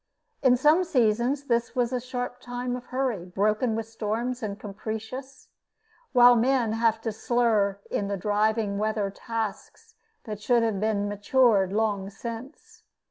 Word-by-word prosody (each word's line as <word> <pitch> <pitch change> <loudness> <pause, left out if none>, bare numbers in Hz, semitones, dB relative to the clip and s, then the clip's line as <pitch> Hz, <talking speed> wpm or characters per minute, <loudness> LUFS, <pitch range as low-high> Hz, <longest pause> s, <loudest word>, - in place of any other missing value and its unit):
In 255 -2 +5
some 305 +7 +4
seasons 250 -2 +1
this 235 -3 0
is 245 0 +1
a 250 - 0
sharp 250 0 -5
time 245 0 -4
of 250 0 -8
hurry, 255 -8 -2
broken 210 +6 0
with 225 0 -3
storms, 225 +3 -3
and 205 -2 -4
capricious, 220 +6 -7 0.6
while 245 -1 +7
men 240 -1 +2
have 225 0 +1
to 225 - -2
slur 215 -3 +1
in 200 - -1
the 200 0 -2
driving 210 +1 0
weather 215 -2 -1
tasks 220 -1 -5 0.3
that 210 -2 -7
should 240 +1 +3
have 220 -4 0
been 205 -1 0
matured 205 -1 +3
long 205 -2 0
since. 230 +7 -9
225 Hz, 145 wpm, -26 LUFS, 210-245 Hz, 0.6 s, while